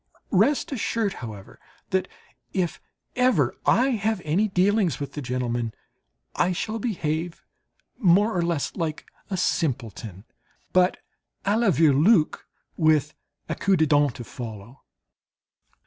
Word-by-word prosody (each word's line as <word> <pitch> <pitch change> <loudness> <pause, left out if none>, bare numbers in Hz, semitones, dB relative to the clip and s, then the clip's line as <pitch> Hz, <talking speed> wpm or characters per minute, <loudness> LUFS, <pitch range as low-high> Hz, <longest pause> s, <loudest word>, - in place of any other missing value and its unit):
Rest 295 0 +2
assured, 225 -5 -1
however, 105 -5 -9 0.3
that 190 0 +1 0.5
if 180 -3 -1 0.3
ever 250 0 +3
I 255 +3 +4
have 220 -3 0
any 180 +8 +2
dealings 195 -1 +2
with 140 - -5
the 150 - -5
gentlemen, 120 -3 -2 0.6
I 180 +1 +2
shall 220 +5 -3
behave 170 -6 -3 0.6
more 205 +1 +4
or 175 - +1
less 170 -4 -1
like 160 -3 -3 0.2
a 190 - -2
simpleton, 115 - -2 0.5
but 185 0 +4 0.5
à 200 +2 +2
la 235 -3 +3
Vireloque 160 - +3 0.3
with 155 -3 +3 0.3
a - - -2
coup 195 -1 +2
de 160 - +4
dent 145 -3 +3
to 120 - -7
follow. 115 0 -9
170 Hz, 125 wpm, -25 LUFS, 135-200 Hz, 0.6 s, I